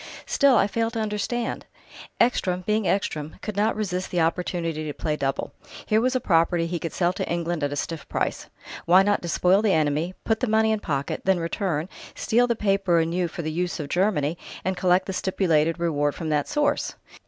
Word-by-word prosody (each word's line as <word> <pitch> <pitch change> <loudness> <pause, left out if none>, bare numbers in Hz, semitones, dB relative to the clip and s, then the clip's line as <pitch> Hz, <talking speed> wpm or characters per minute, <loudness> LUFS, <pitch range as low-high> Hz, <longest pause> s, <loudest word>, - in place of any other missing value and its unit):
"Still 280 -3 +4
I - - +4
fail 225 +2 -1
to 230 -1 -4
understand...." 215 +3 -2 0.5
"Ekstrom, 185 -7 +2
being 215 -2 +1
Ekstrom, 155 -6 -1
could 215 - -4
not 210 +2 +1
resist 185 -3 -2
the 180 - -1
opportunity 165 -1 -1
to 150 -1 -4
play 155 -2 -1
double. 135 -2 -2 0.3
Here 215 +1 +2
was 255 +2 +1
a - - +3
property 170 -4 +2
he 170 0 -3
could 165 - -4
sell 175 0 +1
to - - -4
England 170 -2 -1
at 145 - 0
a - - -2
stiff 160 +1 -5
price. - - -2 0.4
Why 185 +3 +6
not 205 +1 +1
despoil 180 +3 +2
the 215 -3 +2
enemy, 155 +3 0
put 220 -1 0
the 255 - 0
money 220 0 +3
in 220 - +1
pocket, 140 -7 -3
then 190 -1 +3
return, 170 -2 -2 0.3
steal 240 +2 +2
the 235 - +1
paper 195 -4 +2
anew 170 +2 +1
for 170 +1 -6
the 155 - -2
use 175 +2 -2
of 145 -2 -5
Germany, 175 -4 +1 0.3
and 190 0 0
collect 180 +1 +2
the 190 - -4
stipulated 165 -4 +1
reward 145 -4 0
from 160 - -4
that 150 -1 +1
source? 295 -1 0
180 Hz, 200 wpm, -25 LUFS, 165-210 Hz, 0.5 s, Why